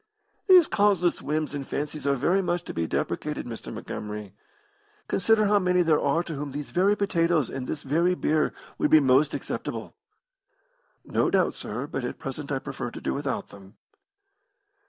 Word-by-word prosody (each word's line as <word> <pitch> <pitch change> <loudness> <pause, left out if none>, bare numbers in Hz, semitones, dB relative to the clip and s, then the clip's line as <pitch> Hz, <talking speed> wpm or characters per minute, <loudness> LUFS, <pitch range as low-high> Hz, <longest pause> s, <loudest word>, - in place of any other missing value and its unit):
"These 365 -3 +8
causeless 200 -5 +2
whims 155 0 -2
and 145 -1 -3
fancies 150 0 -3
are 140 - +3
very 175 +9 +2
much 175 -2 -1
to - - -7
be 85 -1 -1
deprecated, - - -2
Mr. - - -7
Montgomery. 105 -2 -6 0.7
Consider 215 +2 +3
how 205 0 +4
many 180 -1 +3
there 160 -3 +3
are 155 +5 +1
to 165 - -6
whom 145 -1 -5
these 145 0 -6
very 190 +3 +3
potatoes 170 - +1
and 130 -1 -5
this 150 - -4
very 170 +6 +2
beer 155 -3 +1 0.3
would - - +2
be 155 - +8
most 140 +1 +3
acceptable." - - -5 1.1
"No - - +1
doubt, 185 -2 +2
sir, 120 +6 -4
but 135 -3 -4
at 120 - -4
present 140 +2 -6
I 135 - +1
prefer 130 -2 -5
to - - -9
do - - -2
without 140 -1 -3
them." 100 +1 -14
150 Hz, 175 wpm, -26 LUFS, 135-180 Hz, 1.1 s, These